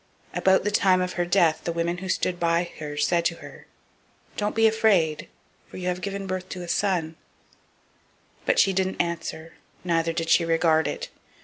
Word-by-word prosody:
004:020 -, -, -5 dB
About 190 Hz, 0 st, +4 dB
the 210 Hz, -, 0 dB
time 190 Hz, -2 st, +3 dB
of 180 Hz, 0 st, -2 dB
her 175 Hz, -, -1 dB
death 175 Hz, -3 st, +2 dB
the 170 Hz, -, -2 dB
women 170 Hz, +1 st, -2 dB
who 190 Hz, +1 st, -6 dB
stood 180 Hz, -1 st, -1 dB
by 170 Hz, +1 st, +1 dB
her 150 Hz, -1 st, -6 dB
said 170 Hz, +4 st, +2 dB
to 170 Hz, -, 0 dB
her, -, -, -13 dB, 0.7 s
Don't 210 Hz, 0 st, -2 dB
be 225 Hz, 0 st, +4 dB
afraid; 195 Hz, -9 st, +2 dB, 0.4 s
for -, -, -11 dB
you 180 Hz, -1 st, -4 dB
have 180 Hz, 0 st, -3 dB
brought 195 Hz, -1 st, -3 dB
forth -, -, -4 dB
a 180 Hz, -1 st, -7 dB
son. 170 Hz, -4 st, -1 dB, 1.3 s
But -, -, +3 dB
she 195 Hz, -, +4 dB
didn't 190 Hz, 0 st, -1 dB
answer, 165 Hz, -1 st, -3 dB, 0.3 s
neither 165 Hz, -2 st, +1 dB
did 165 Hz, 0 st, -3 dB
she 170 Hz, -, +5 dB
regard 165 Hz, -1 st, +2 dB
it. -, -, -5 dB
175 Hz, 185 wpm, -25 LUFS, 165-190 Hz, 1.3 s, she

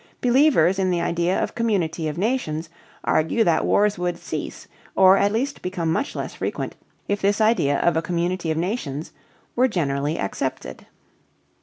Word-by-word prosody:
Believers 245 Hz, -, +4 dB
in 190 Hz, -1 st, +1 dB
the 175 Hz, -1 st, +1 dB
idea 170 Hz, +2 st, 0 dB
of -, -, -1 dB
the -, -, -20 dB
community 190 Hz, -9 st, -1 dB
of 150 Hz, +1 st, -4 dB
nations 175 Hz, -7 st, -1 dB, 0.3 s
argue 160 Hz, +9 st, +2 dB
that 170 Hz, -4 st, +2 dB
wars 205 Hz, -1 st, +2 dB
would 180 Hz, 0 st, -1 dB
cease -, -, -6 dB, 0.3 s
or 190 Hz, 0 st, +7 dB
at 200 Hz, +1 st, +2 dB
least 265 Hz, +6 st, -2 dB
become 180 Hz, -3 st, -2 dB
much 275 Hz, -, -1 dB
less -, -, -4 dB
frequent -, -, -4 dB, 0.3 s
if 205 Hz, 0 st, -1 dB
this 200 Hz, +2 st, +2 dB
idea 215 Hz, -11 st, +3 dB
of 175 Hz, -, +2 dB
a 160 Hz, -, +2 dB
community 175 Hz, 0 st, -2 dB
of 160 Hz, -, 0 dB
nations 165 Hz, -, -3 dB, 0.4 s
were 255 Hz, +2 st, +4 dB
generally 150 Hz, -, -1 dB
accepted. 100 Hz, -, -4 dB
180 Hz, 165 wpm, -23 LUFS, 160-215 Hz, 0.4 s, or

